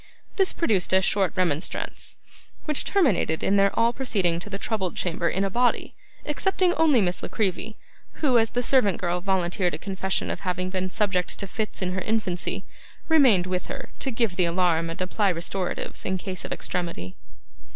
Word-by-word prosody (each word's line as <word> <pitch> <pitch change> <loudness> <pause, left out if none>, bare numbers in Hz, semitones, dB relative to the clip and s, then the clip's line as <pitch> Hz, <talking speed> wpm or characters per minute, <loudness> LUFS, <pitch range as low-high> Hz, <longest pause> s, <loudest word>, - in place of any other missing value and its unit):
This 385 -2 +3
produced 205 - +1
a 190 - +6
short 190 -4 +2
remonstrance, 170 -3 0 0.5
which 300 -3 +1
terminated 220 - +2
in 195 - +2
their 200 0 +5
all 230 +1 +3
proceeding 195 -10 0
to 190 - -6
the 195 - -3
troubled 195 -4 -2
chamber 170 -1 0
in 190 - 0
a - - 0
body, 245 +3 +1 0.3
excepting 360 +4 +1
only 305 -9 +4
Miss 180 -2 +1
La - - -5
Creevy, 215 +1 -2 0.4
who, 260 -6 +3
as 225 0 +2
the 245 +2 -1
servant 230 -8 +3
girl 175 0 -1
volunteered 180 -2 0
a - - -6
confession 190 +2 -2
of - - -4
having 185 -1 -2
been 185 0 -2
subject 185 -2 -1
to 200 - -4
fits 210 0 -4
in 180 - -1
her 185 - -2
infancy, 205 -5 -1 0.5
remained 255 - +5
with 185 0 -3
her 270 -4 -7
to 270 - -1
give 230 -6 -1
the 180 - +3
alarm 170 -1 +1
and 165 - -6
apply 195 +2 +1
restoratives, 175 +2 -3
in 190 0 -1
case 185 0 -6
of - - -7
extremity. 170 - -3
190 Hz, 185 wpm, -25 LUFS, 180-225 Hz, 0.5 s, a